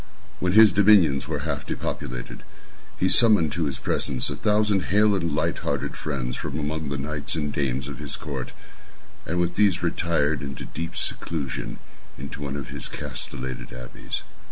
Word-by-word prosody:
When 90 0 +1
his 110 0 +9
dominions 95 -9 +5
were - - -3
half - - -2
depopulated, - - -5 0.6
he 95 - +2
summoned 105 -8 +6
to 85 0 0
his 70 -2 -1
presence 65 -2 0
a - - -2
thousand 105 -3 +2
hale 105 +1 +4
and 85 -6 0
light - - 0
hearted - - -2
friends 65 -5 -3
from 75 - -4
among 80 0 -2
the 70 - -2
knights 75 +2 -2
and 75 -3 -2
dames 65 -2 -1
of 70 -2 -7
his 75 -1 -4
court, 70 -4 -5 0.8
and 90 +1 0
with 85 0 +1
these 100 -2 +3
retired 80 -3 +1
to 70 - -5
the 70 - -7
deep 85 0 -4
seclusion 75 -6 -3 0.4
of 70 +2 -7
one 70 -1 -4
of 70 -2 -5
his - - -4
castellated 65 -2 -5
abbeys. 60 0 -6
75 Hz, 170 wpm, -25 LUFS, 70-90 Hz, 0.8 s, his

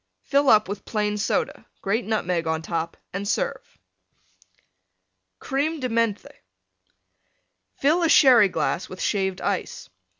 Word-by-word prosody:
Fill 280 -1 +2
up 215 -1 +5
with 200 +1 -6
Plain 210 -1 -1
Soda; 210 - -2
grate 220 +5 -1
Nutmeg 180 -6 -1
on 160 0 -1
top 165 0 -3 0.2
and 195 +2 -4
serve. - - -3 1.6
CREME 300 +3 -2
DE 255 -2 -2
MENTHE 225 -3 -2 1.3
Fill 310 +6 +2
a 335 - +2
Sherry 245 -10 +6
glass 180 - -2
with 185 - -9
Shaved 190 -2 -1
Ice. - - -3
210 Hz, 125 wpm, -24 LUFS, 190-270 Hz, 1.6 s, Sherry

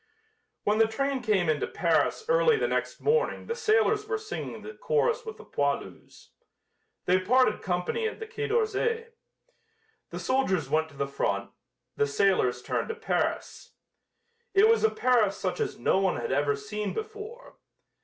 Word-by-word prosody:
When 210 +1 +1
the 225 - +5
train 275 +4 -1
came 205 -7 +1
into 155 -2 +1
Paris 445 - +1
early 480 -2 +4
the - - 0
next - - -2
morning 465 +1 +1
the 465 - -2
sailors 435 -2 +2
were 435 -1 -1
singing 435 0 -6
the 435 - -8
chorus 480 0 0
with 440 - -6
the - - -13
poilus. 140 0 -3 0.8
They 185 +1 +3
parted 225 +3 +3
company 180 - -1
at 445 - -6
the 445 - -5
quai 440 0 -4
d'Orsay. 460 +1 0 1.0
The - - -6
soldiers 190 - 0
went 160 +1 +1
to 140 - -17
the 140 - 0
front; 100 -7 -2 0.5
the 145 - +2
sailors 140 -6 +1
turned - - -2
to 455 - -3
Paris. 455 -1 -2 0.8
It 405 +3 +7
was 455 0 +3
a 440 - +5
Paris 230 - +2
such 185 -2 -3
as - - -2
no 125 - +2
one 190 -2 +1
had - - -3
ever 145 +1 +2
seen 210 +8 -4
before. 440 +3 -8
265 Hz, 165 wpm, -28 LUFS, -, 1.0 s, It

